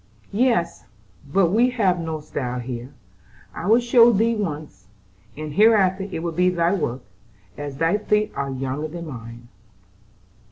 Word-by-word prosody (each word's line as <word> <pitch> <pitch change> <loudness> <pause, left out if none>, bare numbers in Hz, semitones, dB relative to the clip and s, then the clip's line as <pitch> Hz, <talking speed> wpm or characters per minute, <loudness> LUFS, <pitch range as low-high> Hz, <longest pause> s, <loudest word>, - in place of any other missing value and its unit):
"Yes, 220 -7 +1 0.5
but 180 0 +3
we 235 +5 +4
have 200 -8 +1
no 160 -2 -4
style 125 -4 -4
here. 125 +1 -6 0.6
I 175 - -5
will 225 +3 +5
show 240 0 +6
thee 230 +2 +2
once, 150 - -5 0.5
and 155 -1 -6
hereafter 195 -1 +3
it 165 - -4
will 170 - -2
be 180 +3 +2
thy 175 0 +1
work, 130 -9 -2 0.5
as 140 +1 -6
thy 165 +7 +1
feet 210 0 +1
are 140 0 -3
younger 135 +3 -3
than 170 +2 -7
mine." 120 -4 -9
170 Hz, 150 wpm, -22 LUFS, 140-205 Hz, 0.6 s, show